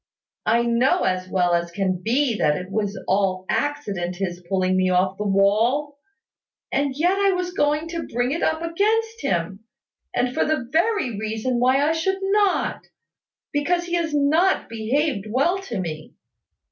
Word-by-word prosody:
I 235 +1 +3
know 240 +9 +2
as 185 0 -1
well 180 -2 +1
as 170 0 0
can 185 0 -2
be 245 +2 +1
that 150 0 +2
it 180 +1 -7
was 205 0 -2
all 190 -1 +1
accident 200 -12 -2
his 175 -1 -4
pulling 185 -1 +1
me 185 0 +2
off 185 +1 +2
the 210 - -1
wall; 230 +9 +2 0.7
and 275 -1 0
yet 360 +5 +2
I 395 -1 +3
was 360 0 -3
going 300 -1 +1
to 335 -1 -4
bring 245 +2 -1
it 330 - -2
up 315 +1 0
against 445 +6 0
him; 170 +3 -1 0.5
and 250 0 0
for - - +1
the 305 -6 -1
very 335 - +1
reason 220 +3 -2
why 260 +4 +3
I - - +3
should 325 +4 0
not, 395 0 +1 0.7
because 345 +5 +1
he 350 0 -6
has 335 -2 0
not 305 +6 +2
behaved 230 0 -1
well 285 - +1
to 240 - -5
me. 155 -4 -6
255 Hz, 165 wpm, -23 LUFS, 195-325 Hz, 0.7 s, I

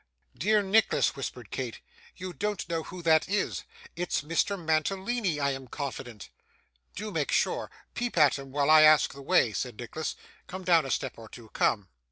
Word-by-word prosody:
'Dear 210 +6 +2
Nicholas,' 210 +3 +3
whispered - - -6
Kate, - - -4 0.4
'you 185 -1 -6
don't 205 +5 -3
know 165 -1 -1
who 175 +2 -9
that 160 0 +4
is. 205 0 -1 0.3
It's 175 -2 -1
Mr 165 +6 0
Mantalini 190 +3 0
I 140 -1 +1
am 135 -1 -6
confident.' 125 -5 -6 0.6
'Do 210 +2 -5
make - - -1
sure! - - +1 0.2
Peep 240 -5 -3
at 145 -3 +5
him 135 -1 -10
while 145 +2 +2
I 155 0 +9
ask 155 0 +6
the 140 - -10
way,' 120 -4 +3
said 120 +1 -4
Nicholas. 155 +6 -4 0.3
'Come 185 +1 -7
down 165 -5 +4
a - - -6
step 130 -2 -2
or 110 -1 -11
two. 115 -3 -12
Come! 100 -2 +1
155 Hz, 180 wpm, -28 LUFS, 135-190 Hz, 0.6 s, I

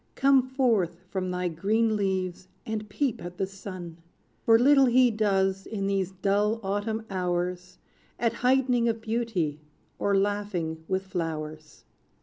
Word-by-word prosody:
Come 270 0 +5
forth 225 -11 +1
from 185 -1 -2
thy 180 0 -1
green 215 +7 +1
leaves, 185 -2 -2 0.2
and 215 -1 -4
peep 255 -1 -1
at 175 0 -8
the 195 - 0
sun! 185 -3 -8 0.4
For 225 0 +5
little 270 +2 +6
he 250 0 +5
does, 195 -3 +1
in 200 -3 -3
these 195 -2 0
dull 205 +3 +1
autumn 210 +3 -2
hours, 180 0 -2 0.4
At 230 -1 +1
height'ning 250 -2 +3
of 225 0 -1
beauty, 220 -10 -1 0.4
or 200 -1 +2
laughing 195 -5 -1
with 190 0 -1
flowers. 155 -4 -5
195 Hz, 135 wpm, -27 LUFS, 180-225 Hz, 0.4 s, little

